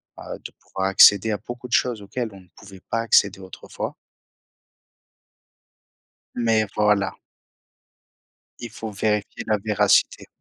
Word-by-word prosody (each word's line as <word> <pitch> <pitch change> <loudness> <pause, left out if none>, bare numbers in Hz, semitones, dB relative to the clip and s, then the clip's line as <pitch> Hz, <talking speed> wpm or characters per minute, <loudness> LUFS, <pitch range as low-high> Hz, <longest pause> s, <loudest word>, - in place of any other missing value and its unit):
bah, - - -8
de - - -10
pouvoir 95 0 -5
accéder 100 +2 +6
à 105 - -1
beaucoup 120 +4 -9
de 125 - -8
choses 120 -4 +1
auxquelles 120 +3 -4
on 95 - -13
ne 90 - -22
pouvait 100 -2 -14
pas 115 - 0
accéder 100 -4 +3
autrefois 95 -1 -7 2.4
mais 115 -2 +1
voilà 105 -2 +1 1.4
il 120 -1 -7
faut 110 0 -7
vérifier 105 0 -2
la 110 -1 +1
véracité. 105 -2 +2
105 Hz, 125 wpm, -23 LUFS, 100-115 Hz, 2.4 s, accéder